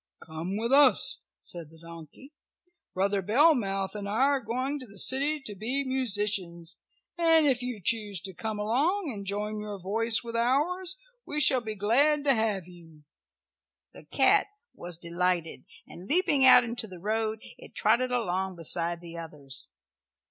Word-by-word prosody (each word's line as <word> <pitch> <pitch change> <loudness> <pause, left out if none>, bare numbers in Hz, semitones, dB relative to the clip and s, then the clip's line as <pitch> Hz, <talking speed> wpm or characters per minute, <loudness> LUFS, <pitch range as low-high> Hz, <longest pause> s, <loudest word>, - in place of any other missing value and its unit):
"Come 165 +5 -6
with 230 +3 -2
us," 280 -1 +5
said 170 -3 -7
the 160 - -18
donkey. 170 - -13 0.6
"Brother 195 +1 +1
Bellmouth 205 - +2
and 205 -1 -6
I - - -3
are 280 0 +2
going 260 +5 -3
to 255 - -11
the 200 -1 -14
city 280 +8 +3
to 215 -6 -7
be 240 +8 -2
musicians, 205 -10 -1 0.4
and 325 -2 +4
if 260 -3 +2
you 250 -3 -5
choose 205 0 0
to 190 0 -6
come 220 +3 -5
along 285 - 0
and 200 -2 -8
join 210 +1 -3
your 210 -1 -6
voice 225 +5 0
with 230 0 -7
ours 320 - 0 0.3
we 300 - -3
shall 265 -3 +3
be 220 -2 -5
glad 280 +9 +2
to 280 -2 +4
have 215 -6 -1
you." 165 -4 -16 0.9
The - - -14
cat - - +3 0.3
was 175 -1 -7
delighted, 170 -1 -2 0.2
and 180 +2 -12
leaping 295 - +3
out 255 - +8
into 235 -1 -4
the 185 -3 -11
road 220 +4 -2 0.2
it - - -14
trotted 245 +4 +2
along 190 -6 -2
beside 170 +1 -1
the 170 -1 -9
others. 145 -5 -8
215 Hz, 160 wpm, -28 LUFS, 180-260 Hz, 0.9 s, out